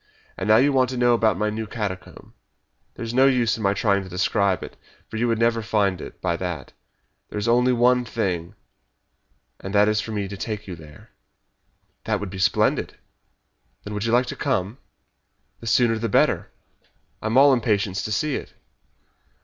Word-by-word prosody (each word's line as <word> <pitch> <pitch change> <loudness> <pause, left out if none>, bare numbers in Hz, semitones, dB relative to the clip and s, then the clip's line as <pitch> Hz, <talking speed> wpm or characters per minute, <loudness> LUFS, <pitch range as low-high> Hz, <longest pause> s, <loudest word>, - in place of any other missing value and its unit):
And - - -4
now 110 0 +6
you 140 +4 +3
want 130 -1 +3
to 130 - -4
know 120 0 +4
about 110 -5 +2
my 105 +2 0
new 110 0 -4
catacomb. 100 -4 -6 0.6
There's 115 0 -5
no 130 +2 +5
use 125 -4 +2
my 100 -2 +1
trying 100 -2 +2
to 95 - -10
describe 95 +1 0
it, - - -9 0.3
for 110 - -6
you 120 +2 +1
would 115 -1 +1
never 115 0 +2
find 100 -5 0
it - - -10
by - - 0
that. - - -5 0.6
There - - -6
is 105 +2 -2
only 125 +2 +4
one 125 +1 +3
thing, 95 -8 -3 1.0
and 95 +2 -6
that 105 +1 +5
is 105 0 +1
for 115 - -7
me 105 -2 -2
to 100 - -7
take 105 +1 -5
you 90 - -6
there." 75 -2 -15 0.9
"That - - 0
would 100 -3 -6
be 95 - -7
splendid." 95 - +1 0.9
"When 105 - -7
would 105 +1 -3
you 115 - 0
like 120 +2 +3
to - - -6
come?" 120 -3 -2 0.8
"The 115 - -9
sooner 115 -1 +3
the 115 0 -2
better. - - +2 0.7
I - - -3
am 115 +3 +1
all 140 0 +7
impatience 105 -5 0
to 110 - -5
see 150 +6 0
it." - - -10
110 Hz, 190 wpm, -23 LUFS, 100-120 Hz, 1.0 s, all